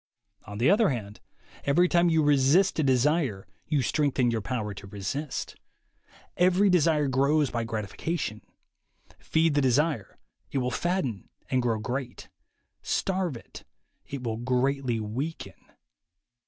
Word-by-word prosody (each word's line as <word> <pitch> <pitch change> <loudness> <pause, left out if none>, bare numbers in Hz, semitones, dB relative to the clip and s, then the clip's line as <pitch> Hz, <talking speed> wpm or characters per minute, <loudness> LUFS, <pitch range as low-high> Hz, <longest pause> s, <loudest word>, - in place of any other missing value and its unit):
On 105 - -7
the 120 +5 +2
other 215 +1 +4
hand, 105 -6 -5 0.4
every 170 +6 +3
time 175 -1 +3
you 160 -1 +3
resist 145 +7 +3
a - - +3
desire 135 - +1 0.2
you 150 -4 +1
strengthen 130 -2 +1
your 115 -1 -1
power 105 -1 -3
to 100 0 -10
resist. 105 +9 -4 0.8
Every 185 +3 +4
desire 155 -4 +3
grows 140 +2 +2
by 115 -1 -2
gratification. 110 - -4 0.8
Feed 160 -1 +1
the 145 - +2
desire, 130 - +1 0.3
it - - -3
will 125 -1 0
fatten 175 - -2 0.2
and 130 -1 +2
grow 115 -2 0
great; 125 +3 -5 0.5
starve 185 -8 -1
it, - - -13 0.4
it 140 -2 -6
will 115 -2 -2
greatly 130 0 0
weaken. 130 +10 -4
135 Hz, 130 wpm, -27 LUFS, 115-160 Hz, 0.8 s, other